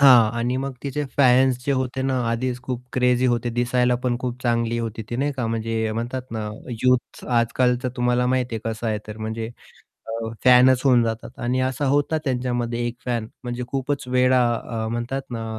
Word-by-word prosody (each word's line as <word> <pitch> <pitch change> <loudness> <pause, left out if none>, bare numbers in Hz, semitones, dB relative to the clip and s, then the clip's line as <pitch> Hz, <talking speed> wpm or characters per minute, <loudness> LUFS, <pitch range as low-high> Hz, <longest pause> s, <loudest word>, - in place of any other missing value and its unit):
हां. 125 -6 +8
आणि 120 +2 0
मग 135 +1 -3
तिचे 145 +1 -2
फॅन्स 130 -1 +5
जे 140 - +1
होते 130 0 -1
ना 130 -1 0
आधीच 125 +1 -2
खूप 125 -1 -4
क्रेझी 125 0 +3
होते 120 -1 +1
दिसायला 125 +1 +2
पण 125 -1 +1
खूप 125 0 -4
चांगली 115 -1 +1
होती 115 -1 -4
ती 120 - -2
नाही 145 +3 0
का 125 -3 -1
म्हणजे 115 0 -1
म्हणतात 120 +3 -3
ना 110 -2 -3 0.3
युथ 125 -1 +1
आजकाल 125 +1 +2
तर 125 - 0
तुम्हाला 125 0 +2
माहिती 125 -2 0
आहे 110 +1 -3
कसं 110 +1 -5
आहे 110 -1 0
तर 105 0 -7
म्हणजे 110 +1 -3 0.6
अ, 115 0 -3 0.2
फॅनच 125 0 +7
होऊन 125 -3 +5
जातात 115 +2 -4
आणि 125 +1 0
असा 130 +2 0
होता 145 +3 +2
त्यांच्यामध्ये 120 -2 -1
एक 120 0 -4
फॅन 120 -3 -2 0.2
म्हणजे 120 0 -3
खूपच 135 +2 -2
वेडा 125 0 +4
अ, 115 -1 -4
म्हणतात 120 +4 -3
ना 115 -2 -4
125 Hz, 190 wpm, -23 LUFS, 115-130 Hz, 0.6 s, हां